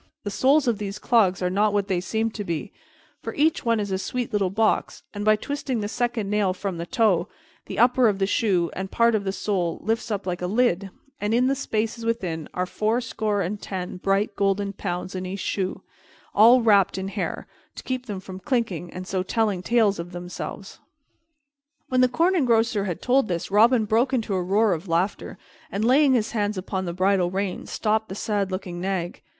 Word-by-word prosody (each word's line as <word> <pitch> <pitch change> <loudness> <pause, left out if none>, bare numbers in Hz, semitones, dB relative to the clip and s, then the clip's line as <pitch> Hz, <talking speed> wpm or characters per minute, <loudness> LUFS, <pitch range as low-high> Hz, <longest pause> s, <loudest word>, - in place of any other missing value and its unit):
The 205 - -4
soles 265 +7 +3
of 225 -3 +1
these 200 -1 -4
clogs 195 -6 +2
are 180 - +1
not 205 +2 +2
what 200 -1 +1
they 185 -3 0
seem 225 +4 -1
to 215 - -5
be, 170 -5 -4 0.5
for - - -6
each 310 +2 +2
one 230 -2 +2
is 205 -2 -3
a 190 - 0
sweet 245 +3 -3
little 200 -3 +1
box; 215 +3 0
and 205 -1 -4
by 215 0 +5
twisting 270 +1 -3
the 205 - -2
second 240 -2 -1
nail 200 -2 +1
from 190 -3 -4
the 170 - -4
toe, 210 -8 +2 0.4
the - - -6
upper 245 +1 +5
of 205 -3 +1
the 195 - +1
shoe 190 -4 +1
and 190 0 -5
part 235 +2 +3
of 210 -2 0
the 190 - 0
sole 185 -4 -1
lifts 225 +2 -1
up 205 -3 -2
like 180 -1 -3
a 180 - -1
lid, 200 -3 +1 0.3
and 210 +2 0
in 250 +1 +3
the 270 - +3
spaces 225 -4 -2
within 180 -9 -2
are 180 - 0
fourscore 215 0 -1
and 200 +4 -4
ten 185 -2 -5
bright 195 +3 0
golden 200 0 0
pounds 185 -1 -4
in 185 -1 -4
each 195 +2 -5
shoe, 190 0 -2 0.5
all 235 +4 +7
wrapped 200 -4 +4
in 190 0 -3
hair, 200 0 -4 0.3
to - - -8
keep 255 -1 -4
them 205 -3 -4
from 185 0 -9
clinking 205 - -2
and 185 0 -7
so 185 0 -1
telling 205 -1 0
tales 215 -3 +2
of 170 +1 -6
themselves." 175 +3 -7 1.1
When 255 0 +3
the 255 - +5
Corn 335 +9 +2
Engrosser 230 - +2
had 180 -4 -4
told 255 -1 +3
this, 175 +1 -3
Robin 225 +2 +5
broke 235 +5 +2
into 225 -5 0
a 185 - 0
roar 200 +3 +2
of 170 +3 -5
laughter 175 +4 -1 0.3
and, 210 +3 -1
laying 270 +3 +5
his 225 -3 0
hands 210 -2 -1
upon 190 0 -3
the 170 - -3
bridle 185 0 +2
rein, 190 0 -3
stopped 220 0 0
the 190 - -5
sad 205 -2 -1
looking 180 -2 -5
nag. 185 -2 -3
205 Hz, 205 wpm, -24 LUFS, 185-230 Hz, 1.1 s, all